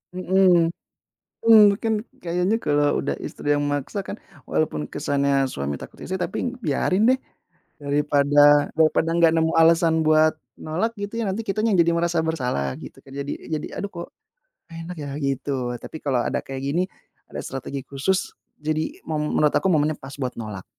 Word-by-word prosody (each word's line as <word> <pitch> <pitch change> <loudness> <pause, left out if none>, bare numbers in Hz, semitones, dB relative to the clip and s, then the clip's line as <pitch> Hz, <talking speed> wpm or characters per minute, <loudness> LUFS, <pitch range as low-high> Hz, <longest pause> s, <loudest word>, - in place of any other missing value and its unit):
Mhm, 185 -2 +3 0.7
mmm, 225 -1 +8 0.2
kan 220 -2 +1 0.2
kayaknya 180 +5 +1
kalau 145 -2 +2
udah - - 0
istri 145 - -2
yang 145 - +1
maksa 145 +8 -2
kan, 195 +1 -6 0.3
walaupun 75 - -1
kesannya 140 -1 +1
suami 70 +1 -3
takut - - -12
istri, 190 - -4
tapi 215 +7 -3
biarin 190 - +2
deh, 260 - +1 0.6
daripada 145 0 +4
daripada 160 0 +3
nggak 165 -1 +5
nemu 160 0 +2
alasan 165 0 +5
buat 155 0 +5 0.3
nolak 180 +9 -1
gitu 205 +3 -4
ya, - - -1
nanti 205 +4 -2
kitanya 215 0 +1
yang - - +5
jadi 170 - +2
merasa 170 0 0
bersalah 125 - -1
gitu - - -11
kan, 135 - -14
jadi 140 +1 -4 0.2
jadi 150 - -5
aduh 200 - -4
kok 170 - -7 0.6
enak 165 +2 -7
ya 145 -1 -5
gitu. 135 -2 -2
Tapi - - -9
kalau 130 -4 +1
ada - - -1
kayak 135 0 -6
gini 150 +6 +1 0.5
ada - - -6
strategi 135 +1 -5
khusus, 165 +8 -1 0.3
jadi 155 +1 -2
mom 150 -1 -1
menurut 150 -1 +3
aku 190 - +2
momennya 150 -1 +2
pas 135 +1 -10
buat 125 -2 -2
nolak. 105 -4 -6
155 Hz, 165 wpm, -23 LUFS, 140-180 Hz, 0.7 s, mmm